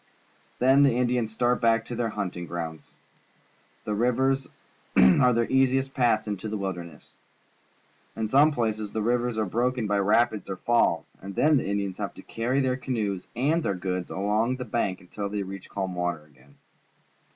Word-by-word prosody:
Then 135 +3 +5
the 135 -4 +4
Indians 120 -3 0
stai't 125 0 +2
back 115 -1 +3
to 120 - -6
their 115 -1 -1
hunting 90 -5 -4
grounds. 80 -2 -6 1.0
The 105 - -2
rivers 130 +4 +1 0.5
are 125 +8 +6
their 115 0 +2
easi 130 +1 +3
est 135 0 -3
paths 115 -4 +2
into 105 +1 -4
the 110 - -3
wilderness. 90 -6 -6 1.0
In 110 -1 -2
some 140 +7 +5
places 110 -5 -2
the 110 - -1
rivers 120 0 0
are 110 - +1
broken 120 +4 0
by 100 -1 +1
rapids 105 0 +2
or 95 - -2
falls, 120 +5 +2 0.2
and 95 0 -8
then 150 +6 +4
the 130 - -2
Indians 100 -1 -2
have 100 -3 -4
to - - -12
carry 125 +4 -1
their 130 -1 0
canoes 105 -8 -3
and 150 +7 +1
their 100 - -1
goods 90 0 -3
along 105 +6 0
the 125 0 -6
bank 95 -6 -1
until 100 +3 -5
they 105 0 -2
reach 95 -1 -9
calm 95 -2 -3
water 90 -3 -2
again. 70 -1 -23
110 Hz, 175 wpm, -26 LUFS, 95-125 Hz, 1.0 s, are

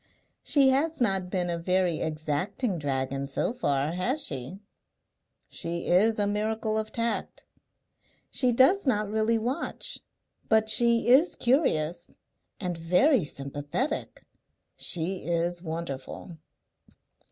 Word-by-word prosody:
"She 275 -3 +4
has 310 +5 0
not 195 -6 +1
been 180 -1 -1
a 170 -1 -2
very 180 -1 +1
exacting 160 - -2
dragon 135 -1 -2
so 140 - -1
far, 145 - -1
has 245 - +1
she?" 135 +6 -2 0.9
"She 170 0 -3
is 215 +5 +3
a 205 - +1
miracle 215 +1 -1
of 220 0 -2
tact." 230 0 -3 0.9
"She 255 -3 +2
does 275 +9 +4
not 210 -4 +1
really 220 +1 +1
watch. 255 - 0 0.5
But 220 -1 +3
she 235 +1 +4
is 270 +8 +5
curious 175 - 0 0.5
and 180 -3 -4
very 185 - +3
sympathetic." 145 - -4 0.5
"She 180 +3 -1
is 170 0 -2
wonderful.".... 165 0 -6
190 Hz, 115 wpm, -27 LUFS, 165-235 Hz, 0.9 s, is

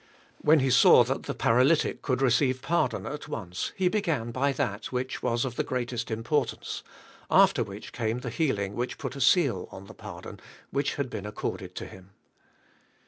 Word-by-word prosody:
When 155 -1 +5
He 130 0 +2
saw 125 - +7
that - - -3
the - - -3
paralytic 130 +7 +3
could 130 -1 0
receive 130 +1 +2
par 170 - +2
don - - -6
at 150 - -6
once, 90 -5 -4
He 185 - +1
tiegan 165 - 0
by 140 +3 +1
that, 105 -5 -2
which 130 0 -3
was 120 0 0
of 125 -2 -5
the - - +1
greatest 120 -1 -3
importance; 115 +6 -2 0.5
after - - +5
which - - -9
came 115 +1 -2
the 125 -2 -4
healing 105 -9 0
which 120 +3 -3
put 135 -3 -5
a 140 - -5
seal 130 - +3
on 95 - -10
the - - -12
pardon - - -9 0.3
which 140 +1 0
'had 140 -3 -3
been 105 - -5
accorded 105 - -5
to - - -5
him. 95 +1 -14
125 Hz, 185 wpm, -28 LUFS, 115-140 Hz, 0.5 s, saw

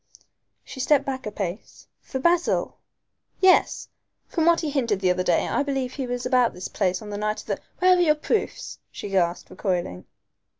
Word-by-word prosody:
She - - -10
stepped 280 +1 +3
back 260 -3 -4
a - - -4
pace. 195 0 -6
"For 265 - -5
Basil?" 340 +5 +1 0.6
"Yes. 375 -1 +3 0.4
From 330 -1 0
what 340 -1 +5
he 310 -3 -2
hinted 235 -8 0
the 185 -2 +2
other 180 0 0
day 175 -2 +2
I - - 0
believe 270 -3 -2
he 265 -3 -4
was 245 0 -3
about 250 -2 +2
this 180 - -5
place 185 -1 -1
on 210 - -8
the 205 - -4
night 215 0 -1
of - - -18
the - - -2
" - - -41
"Where 365 0 +5
are 355 - +2
your 305 -3 +4
proofs?" 360 +8 -2
she 205 - -7
gasped, 180 -3 0
recoiling. 175 - -2
250 Hz, 200 wpm, -24 LUFS, 195-295 Hz, 0.6 s, what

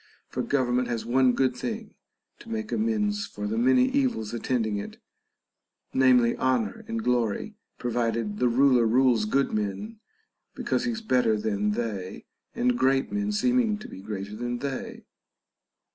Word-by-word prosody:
For - - -3
government 125 -2 +1
has 120 -2 -3
one 125 +1 +3
good 130 -1 +1
thing 220 - -5 0.5
to 230 - -13
make 220 -1 -4
amends 210 -2 0
for - - -6
the 215 +1 -2
many 255 +1 +5
evils 255 - 0
attending 115 -3 -1
it, 100 - -7 1.0
namely, 125 -3 +4
honor 125 -6 0
and 115 -1 -3
glory, 120 - 0 0.2
provided 115 -3 -1
the 125 - +3
ruler 125 -1 +4
rules 120 -2 +3
good 135 +6 +1
men 110 - -3 0.6
because - - -1
he 245 - 0
is 225 -1 -5
better 125 - +2
than 105 0 0
they, 105 -5 -4 0.3
and 245 +1 +2
great 135 0 +2
men 205 0 -1
seem 245 +5 +2
ing 220 -4 +1
to 215 - -10
be 95 - -10
greater 100 0 -6
than 120 +2 -3
they. 135 +1 -5
125 Hz, 155 wpm, -26 LUFS, -, 1.0 s, many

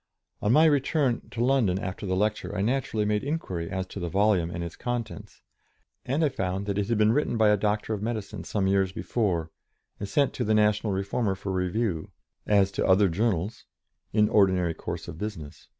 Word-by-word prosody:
On 105 - +1
my 155 +4 +6
return 145 -3 +1
to 120 +1 -1
London 125 -9 +2
after 95 +1 -5
the 95 - 0
lecture 105 -1 -1
I - - 0
naturally 115 -2 0
made 105 0 0
inquiry 95 - -3
as 95 0 -3
to - - -7
the 85 -2 -3
volume 95 -3 +2
and 85 0 -4
its 85 -1 -6
contents, 120 -3 -5 0.6
and 145 +5 +1
I - - +2
found 95 -6 -3
that 100 0 -1
it 100 - -1
had 115 - +2
been 105 0 +4
written 145 -3 0
by 110 -1 +4
a 105 - +5
Doctor 105 +1 -1
of 105 - -4
Medicine 110 -2 -4
some 100 -2 -1
years 95 -1 +2
before, 90 -7 -1 0.5
and 100 - -5
sent 140 +2 +2
to 125 - -2
the 110 -1 +2
National 105 0 +2
Reformer 100 +2 -1
for 95 0 -5
review, 90 -1 -1 0.4
as 100 -2 +3
to - - -1
other 95 +1 +5
journals, 100 +2 -1 0.5
in 105 0 +3
ordinary 95 -5 +3
course - - -6
of 80 - -8
business. 95 -9 -7
105 Hz, 200 wpm, -27 LUFS, 95-115 Hz, 0.6 s, my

